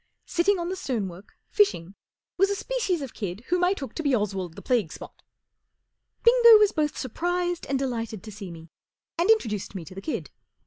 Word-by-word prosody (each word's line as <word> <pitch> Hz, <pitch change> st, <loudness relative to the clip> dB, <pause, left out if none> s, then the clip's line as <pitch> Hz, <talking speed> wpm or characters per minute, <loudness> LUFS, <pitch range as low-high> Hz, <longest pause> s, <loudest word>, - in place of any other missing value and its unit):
Sitting 380 Hz, +4 st, +2 dB
on 345 Hz, 0 st, -3 dB
the 375 Hz, -, -2 dB
stonework, 205 Hz, -, -5 dB
fishing, 195 Hz, -, +2 dB, 0.4 s
was 390 Hz, +2 st, +3 dB
a 405 Hz, -, 0 dB
species 395 Hz, -, -1 dB
of 265 Hz, -, -7 dB
kid 200 Hz, -1 st, -5 dB
whom 360 Hz, 0 st, +2 dB
I 360 Hz, +2 st, +4 dB
took 270 Hz, -, -7 dB
to -, -, -4 dB
be 285 Hz, -4 st, +2 dB
Oswald 195 Hz, -6 st, -2 dB
the -, -, -9 dB
Plague 235 Hz, -, +1 dB
Spot; -, -, -11 dB, 1.0 s
Bingo 470 Hz, -1 st, +8 dB
was 420 Hz, -1 st, +4 dB
both 300 Hz, -1 st, -1 dB
surprised 350 Hz, +7 st, -2 dB
and 275 Hz, -, 0 dB
delighted 230 Hz, -6 st, -3 dB
to 215 Hz, -, -9 dB
see 200 Hz, -2 st, -8 dB
me, 165 Hz, -1 st, -11 dB, 0.5 s
and 350 Hz, +5 st, +2 dB
introduced 215 Hz, -, +1 dB
me 175 Hz, -4 st, -5 dB
to 185 Hz, -, -11 dB
the 195 Hz, -, -8 dB
kid. 310 Hz, -, -4 dB
270 Hz, 190 wpm, -26 LUFS, -, 1.0 s, Bingo